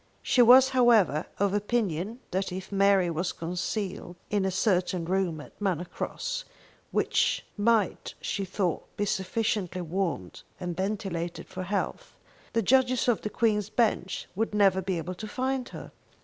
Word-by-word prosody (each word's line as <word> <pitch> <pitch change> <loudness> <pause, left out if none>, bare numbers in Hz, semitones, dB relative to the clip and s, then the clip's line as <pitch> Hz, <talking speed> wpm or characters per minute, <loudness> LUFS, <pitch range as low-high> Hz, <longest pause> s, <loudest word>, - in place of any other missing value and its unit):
She 250 - +4
was, 255 +2 +8
however, 235 - +4
of 200 -1 +1
opinion 210 0 -1
that 190 +1 -1
if 190 +2 -6
Mary 195 -3 +4
was 175 +3 -1
concealed 180 +2 -4 0.2
in 205 -2 +1
a - - +2
certain 185 -2 +1
room 180 -3 0
at 150 - -13
Manor 180 -4 0
Cross, - - -4 0.5
which - - +1
might 215 -1 +1
she 200 - -2
thought 185 -2 -3
be 205 - +1
sufficiently 190 -2 -1
warmed 165 - -3 0.2
and 180 -2 -4
ventilated 185 -3 -3
for 185 0 -6
health, 195 +2 -3 0.4
the 230 -1 +2
judges 255 +2 +3
of 240 -3 +2
the 210 - -3
Queen's 210 -3 +1
Bench 215 -6 0
would 215 +1 -1
never 195 -2 +4
be 185 -1 -2
able 175 +3 -4
to 215 +4 -7
find 260 +2 -2
her. - - -9
195 Hz, 150 wpm, -28 LUFS, 180-220 Hz, 0.5 s, was